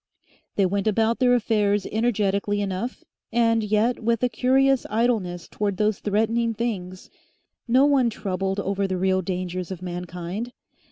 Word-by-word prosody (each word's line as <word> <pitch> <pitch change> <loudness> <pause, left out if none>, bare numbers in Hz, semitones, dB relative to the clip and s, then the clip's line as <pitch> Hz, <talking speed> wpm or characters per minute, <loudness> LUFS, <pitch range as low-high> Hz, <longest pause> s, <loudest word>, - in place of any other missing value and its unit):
They 200 - +3
went 200 +2 -1
about 225 +2 +2
their 250 -1 +4
affairs 210 -3 +1
energetically 205 -2 0
enough 200 +5 -3 0.3
and 230 -1 +2
yet 215 +3 +1
with 230 +1 +1
a 250 - +3
curious 265 +3 +3
idleness 210 -6 0
towards 200 -2 -2
those 210 -1 +1
threatening 225 +2 0
things. 185 -6 -4 0.6
No 255 +4 +5
one 275 -4 +3
troubled 195 -2 -2
over 195 0 -1
the 185 -1 -2
real 190 0 +1
dangers 180 0 -4
of 185 -1 -7
mankind. 180 +5 -5
210 Hz, 145 wpm, -24 LUFS, 190-235 Hz, 0.6 s, No